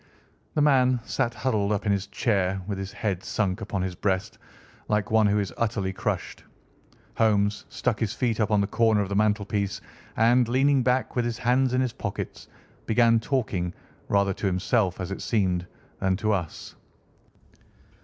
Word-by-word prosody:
The 150 - +3
man 130 -3 +4
sat 120 +1 -1
huddled 110 -3 0
up 105 0 -1
in 105 - +2
his 100 0 0
chair, 95 -4 0
with 100 -1 -4
his 95 0 -5
head 100 -6 -2
sunk 100 -1 -1
upon 100 -3 -2
his 95 -1 -2
breast, 95 +1 -2 0.5
like 105 0 0
one 110 -1 +5
who 100 +1 +2
is 100 -3 -2
utterly 100 -4 -1
crushed. - - -3 0.7
Holmes 105 -2 +2
stuck - - -1
his 110 -3 0
feet 115 -3 -1
up 110 0 +2
on 105 -2 +3
the - - +2
corner 110 0 +2
of 100 - -3
the 100 - -2
mantelpiece 105 -1 0 0.4
and, 120 +2 +4
leaning 135 +3 +3
back 125 +1 0
with 120 - +1
his 120 -1 -2
hands 125 +2 +2
in 130 - +2
his 125 -3 -1
pockets, - - -5 0.4
began 115 0 +4
talking, 105 -9 -2 0.3
rather 100 -1 +2
to 100 - -2
himself, 95 +1 +1
as 95 0 -4
it 95 - -5
seemed, 90 -5 0 0.3
than 95 -1 +1
to 110 +1 0
us. 90 -6 -4
105 Hz, 175 wpm, -26 LUFS, 95-115 Hz, 0.7 s, one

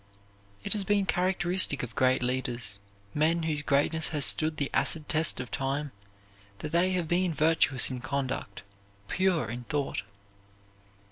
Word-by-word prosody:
It - - 0
has 210 -2 -1
been 200 0 +1
characteristic 180 -5 +1
of 120 -2 -6
great 130 0 +2
leaders, 120 -5 -3 0.3
men 160 +3 +1
whose 155 -2 0
greatness 150 +3 +2
has 150 -3 +2
stood 155 0 +4
the 140 - -2
acid 155 -2 -1
test 155 -3 +1
of 125 -2 -6
time, 140 +1 -2 0.7
that 150 - -6
they 180 +2 +2
have 180 -3 -1
been 175 0 +1
virtuous 150 -4 +3
in 130 - -4
conduct, 130 -6 -4 0.4
pure 185 0 +1
in 120 +2 -6
thought. 145 +2 -2
150 Hz, 145 wpm, -28 LUFS, 130-170 Hz, 0.7 s, stood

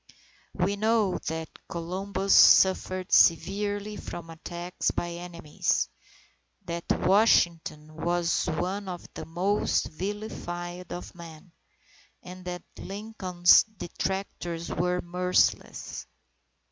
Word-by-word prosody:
We 200 +3 0
know 215 -2 +2
that 160 0 -3 0.2
Columbus 190 +3 -1
suffered 185 -1 +5
severely 205 +4 +3
from 165 -1 -8
attacks 175 +2 -3
by 175 - -2
enemies, 170 -3 -2 0.8
that 170 -1 -4
Washington 170 -6 +2
was 170 +1 0
one 185 +5 -2
of 180 -2 -6
the - - -7
"most 185 +5 0
vilified 175 -1 -5
of 175 - -7
men," 170 0 -12 0.7
and 180 0 -10
that 180 0 -5 0.2
Lincoln's 195 -4 +3
detractors 190 -4 -4
were 180 +1 0
merciless. 180 +1 0
180 Hz, 95 wpm, -27 LUFS, 170-195 Hz, 0.8 s, suffered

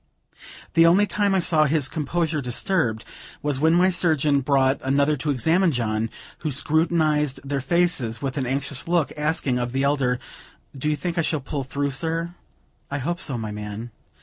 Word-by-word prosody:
The 165 0 +6
only 190 +5 +5
time 205 -1 +1
I - - +3
saw 160 -3 +3
his 150 -2 +2
composure 160 +1 -1
disturbed, 120 - -1 0.4
was 145 -3 -1
when 160 +3 +4
my 185 +2 +4
surgeon 155 -5 +2
brought 135 0 +2
another 140 +3 +2
to 150 +3 -3
examine 165 +7 +2
John, 115 -3 -1 0.3
who 155 - -3
scrutinized 155 -1 +1
their 140 -1 -1
faces 170 -8 0
with 135 0 -3
an 135 -4 -2
anxious 140 +2 0
look, 170 -3 +1
asking 150 -4 0
of 120 0 -3
the 135 +1 0
elder: 140 -3 +1 0.6
"Do 140 +3 -1
you 150 - +1
think 170 +2 -3
I - - +4
shall 155 -1 0
pull 140 +1 -4
through, 140 +2 -2
sir?" 165 +4 -2 0.6
"I 145 - -2
hope 170 +6 -2
so, 135 -9 -3
my 110 -2 -4
man." 105 +3 -6
145 Hz, 175 wpm, -23 LUFS, 130-165 Hz, 0.6 s, The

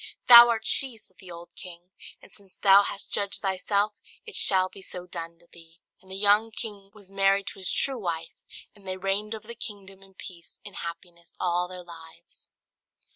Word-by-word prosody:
"Thou 240 -1 +10
art 230 -1 -1
she!" 260 -4 +3
said 190 -4 -17
the 185 - -15
old 170 0 -11
king; 180 -1 -12 0.3
"and - - -16
since 195 -2 -14
thou 195 0 +6
hast 200 0 -6
judged 200 0 -2
thyself, 200 +2 0 0.3
it 440 - -11
shall 185 -1 +4
be 195 - -15
so 180 -1 -8
done 170 -1 -7
to 170 - -23
thee." 165 0 -17 0.2
And 190 - -21
the 190 - -7
young 205 +3 +3
king 210 -3 -9
was 200 -2 -17
married 195 0 +1
to - - -16
his 185 - -1
true 270 -3 0
wife, 165 -4 -6 0.3
and 200 -2 -17
they 185 0 -4
reigned 200 +3 -2
over 215 0 -12
the 235 - -8
kingdom 195 -4 -11
in 195 0 -20
peace 170 -3 -13
and 205 - -9
happiness 170 0 -9
all 180 0 -1
their 180 0 -10
lives. 165 -2 -14
195 Hz, 195 wpm, -26 LUFS, 175-205 Hz, 0.3 s, Thou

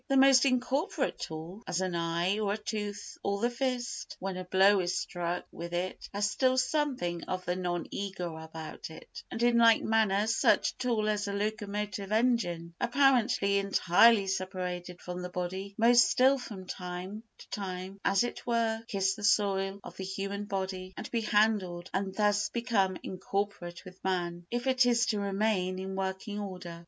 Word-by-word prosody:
The 275 - +2
most 270 -1 +7
incorporate 265 +3 0
tool—as 170 +4 -5
an 185 -1 -1
eye 170 +4 0
or 205 -2 0
a - - -2
tooth 210 -1 -5
or 200 0 -1
the 240 +3 +1
fist, 250 -1 -3
when 190 0 -3
a 185 - -4
blow 190 +2 +5
is 180 -1 0
struck 175 0 -3
with 170 +1 -7
it—has 185 +3 -2
still 255 +4 +2
something 255 - 0
of 185 0 -4
the 180 - 0
non 175 -1 -2
ego 180 -4 -4
about 160 0 -8
it; 160 - -11
and 230 - -3
in 240 -1 +4
like 230 -1 +6
manner 215 -2 +2
such 225 +1 +3
a - - -28
tool 235 -4 0
as 210 -1 0
a 200 - -2
locomotive 205 -1 -3
engine, 215 -8 +1
apparently 245 -6 +3
entirely 200 +2 +5
separated 180 -2 -3
from 180 0 -5
the 180 - -5
body, 190 +3 -4
must 240 +2 +6
still 265 +2 +4
from 205 -6 -8
time 180 +3 -6 0.2
to - - -14
time, 190 0 -5
as 195 +2 +3
it 240 - -4
were, 230 -2 +1
kiss 195 -2 +1
the 210 +1 -9
soil 195 -1 +2
of - - -10
the 190 - -5
human 195 +2 -4
body 190 -1 -4
and - - -6
be 235 - 0
handled, 205 -5 +1
and 190 0 -2
thus 205 -1 +2
become 220 -6 +1
incorporate 190 -1 -4
with 185 0 -13
man, 175 -2 -2
if 240 +1 -2
it 260 -1 +4
is 240 -1 +3
to 210 -3 0
remain 195 -2 0
in 190 +1 -5
working 190 +2 -3
order. 180 -4 -6
200 Hz, 170 wpm, -30 LUFS, 185-225 Hz, 0.2 s, most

